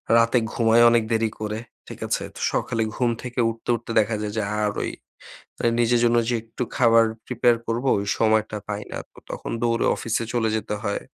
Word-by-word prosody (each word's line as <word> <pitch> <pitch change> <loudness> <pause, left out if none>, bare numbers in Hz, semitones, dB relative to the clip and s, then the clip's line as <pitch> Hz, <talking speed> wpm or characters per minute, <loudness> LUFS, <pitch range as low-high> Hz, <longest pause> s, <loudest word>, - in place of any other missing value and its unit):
রাতে 115 +1 +4
ঘুমাই 115 0 +4
অনেক 115 -1 +3
দেরি 115 0 +2
করে, 105 0 -3 0.3
ঠিক - - -9
আছে? - - -1
তো - - -9
সকালে 115 -1 -1
ঘুম 125 -1 +1
থেকে 125 0 -5
উঠতে, 115 +1 -8
উঠতে 115 - -7
দেখা 110 +1 +1
যায় 105 -1 -3
যে - - +2 0.2
আর 105 - +1
ওই - - -2 0.7
অ্যা 120 - +1
নিজের 120 0 +3
জন্য 120 0 +3
যে 125 - +1
একটু 115 +2 -6
খাবার 115 -3 +5 0.2
prepare 120 -1 +2
করবো 120 +4 -1
ওই 100 - -3
সময়টা 110 -1 +2
পাই 105 0 -3
না। - - -4
তো - - -18
তখন - - -5
দৌড়ে 115 0 +1
অফিসে 115 0 -1
চলে 115 -2 +1
যেতে 105 0 -3
হয় 100 -2 -1
115 Hz, 200 wpm, -24 LUFS, 110-120 Hz, 0.7 s, খাবার